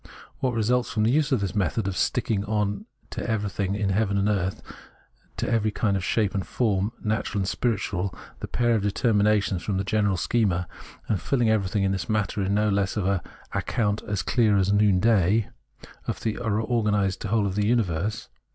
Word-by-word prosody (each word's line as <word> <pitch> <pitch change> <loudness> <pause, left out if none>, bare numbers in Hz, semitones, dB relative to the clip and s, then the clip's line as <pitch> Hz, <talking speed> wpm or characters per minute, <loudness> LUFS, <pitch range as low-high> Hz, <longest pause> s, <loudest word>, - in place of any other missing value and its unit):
What 125 -3 0
results 120 +3 +1
from 110 - 0
the 110 - +3
use 150 +1 +2
of 130 -6 +2
this 95 -3 -2
method 100 +1 0
of 100 - -2
sticking 100 +2 0
on 105 -1 -1 0.2
to - - -4
everything 100 -3 -1
in 100 -1 0
heaven 100 0 +1
and 100 +1 +1
earth, 95 -3 -1 0.7
to - - -2
every 110 -2 +1
kind 105 -1 0
of 95 - -2
shape 105 +1 +1
and 95 - -1
form, 105 -2 0
natural 105 -1 -1
and 95 - -2
spiritual, 100 -5 -1 0.3
the - - -5
pair 120 -1 +1
of 110 - +2
determinations 105 -3 +2
from 95 +2 -2
the 95 - 0
general 100 -1 +1
schema, 90 -4 +1 0.4
and 105 - 0
filing 120 -5 +1
everything 100 -2 +1
in 95 - +2
this 95 -2 -3
manner, 105 -1 0
is 95 - -1
no 105 +1 +2
less 100 -1 0
than 105 -3 -1
an 100 -1 +2 0.2
" - - -22
account 105 -2 0
as 100 -2 -1
clear 110 -4 +3
as 100 +1 +2
noonday 105 0 +3 0.2
" - - -19
* - - -25
of - - -2
the 110 -2 -2
organised 105 -3 0
whole 105 0 +1
of 95 - -1
the 105 +1 +1
imiverse. 105 -1 -1
105 Hz, 195 wpm, -25 LUFS, 100-110 Hz, 0.7 s, the